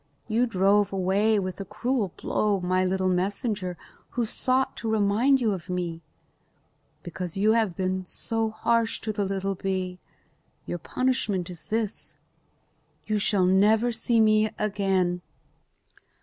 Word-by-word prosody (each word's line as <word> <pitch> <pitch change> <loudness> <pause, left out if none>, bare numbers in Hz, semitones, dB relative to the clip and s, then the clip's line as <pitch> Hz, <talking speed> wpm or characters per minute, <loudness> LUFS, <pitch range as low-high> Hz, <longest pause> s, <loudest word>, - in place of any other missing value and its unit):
You 235 +3 +2
drove 200 0 +3
away 195 +3 +2
with 185 -1 -3
a - - -2
cruel 235 -2 -1
blow 205 -2 0
my 185 +1 +1
little 185 0 0
messenger 185 0 -1 0.4
who 240 - +2
sought 260 +4 0
to 225 - -3
remind 220 +6 +3
you 230 -4 +1
of 185 -2 -5
me. 175 -2 -3 1.0
Because 175 +1 -6
you 210 +3 +4
have 220 -6 +2
been 185 +1 -1
harsh 225 0 0
to 215 - -3
the 205 -1 -1
little 195 0 -1
bee, 185 -1 -3 0.7
your 175 - -4
punishment 205 -4 -1
is 170 - -9
this: 220 -1 -2 0.9
You 215 -1 0
shall 200 -2 +2
never 210 +6 +4
see 230 0 +1
me 215 0 +4
again." 195 -4 0
200 Hz, 135 wpm, -26 LUFS, 185-220 Hz, 1.0 s, you